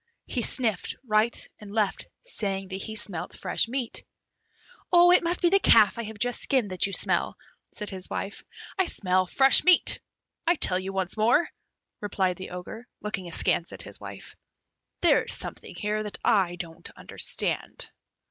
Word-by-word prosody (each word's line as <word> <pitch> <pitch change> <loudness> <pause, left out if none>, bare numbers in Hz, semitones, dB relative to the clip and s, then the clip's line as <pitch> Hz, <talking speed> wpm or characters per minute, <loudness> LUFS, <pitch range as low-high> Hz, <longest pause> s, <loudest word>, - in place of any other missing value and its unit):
He 250 - -2
sniffed 225 -4 +1
right 215 +1 +1
and 210 -1 -11
left, 210 -2 -1 0.2
saying 195 - -2
that 190 0 -5
he 220 +2 -5
smelt 195 -6 -4
fresh - - +1
meat. 245 0 -3 0.9
"It 355 0 +6
must 345 +1 -1
be 345 - +5
the 395 - +5
calf 225 - +5
I - - -2
have 220 0 -8
just 245 +3 -1
skinned 250 -8 +1
that 185 +1 +1
you - - -6
smell," - - 0 0.3
said 210 -1 -5
his 190 -1 -6
wife. 200 - -5 0.4
"I 380 - +3
smell 185 -1 +1
fresh 270 +7 +5
meat, 365 -1 +5 0.5
I 345 - +4
tell 185 - +1
you 190 +1 -5
once 190 +1 -3
more," 240 +9 +3 0.5
replied 190 -3 -1
the 185 - -7
Ogre, 180 +7 -8
looking 200 -4 -4
askance 170 0 0
at - - -7
his - - -8
wife; - - -10 0.7
"there - - +5
is - - +2
something - - -6
here 210 0 -2
that 210 -1 -4
I 185 -4 +3
don't 165 -2 -7
understand." - - -2
210 Hz, 165 wpm, -26 LUFS, 190-245 Hz, 0.9 s, It